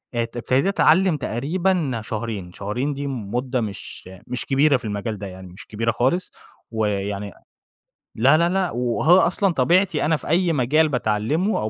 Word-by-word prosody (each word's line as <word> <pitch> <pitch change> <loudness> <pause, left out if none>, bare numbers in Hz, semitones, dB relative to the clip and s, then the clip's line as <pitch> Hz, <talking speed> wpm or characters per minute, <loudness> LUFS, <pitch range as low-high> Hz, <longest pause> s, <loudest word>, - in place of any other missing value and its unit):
ات 115 0 -2
ابتديت 130 +7 +1
أتعلّم 185 -3 +3
تقريبًا 145 - -1
شهرين 105 -5 -5
شهرين 120 +10 -3
دي 140 +1 -4
مدة 125 +1 -2
مش 100 -3 -7 0.2
مش 125 0 -2
كبيرة 140 +1 +3
في 120 - -11
المجال 105 +1 -3
ده 100 0 -6
يعني 95 0 -10
مش 90 +5 -13
كبيرة 115 +2 -1
خالص، 130 - 0 0.4
ويعني 100 -2 -2 0.8
لا، 135 +7 +5
لا، 170 +1 +2
لأ 190 -1 0
وهو 125 +8 +3
أصلًا 195 -1 +1
طبيعتي 175 +5 +2
أنا 160 +1 +2
في - - -7
أي 170 +1 +2
مجال 150 +4 +2
باتعلّمه 125 - 0
أو 110 - -2
125 Hz, 160 wpm, -22 LUFS, 110-160 Hz, 0.8 s, لا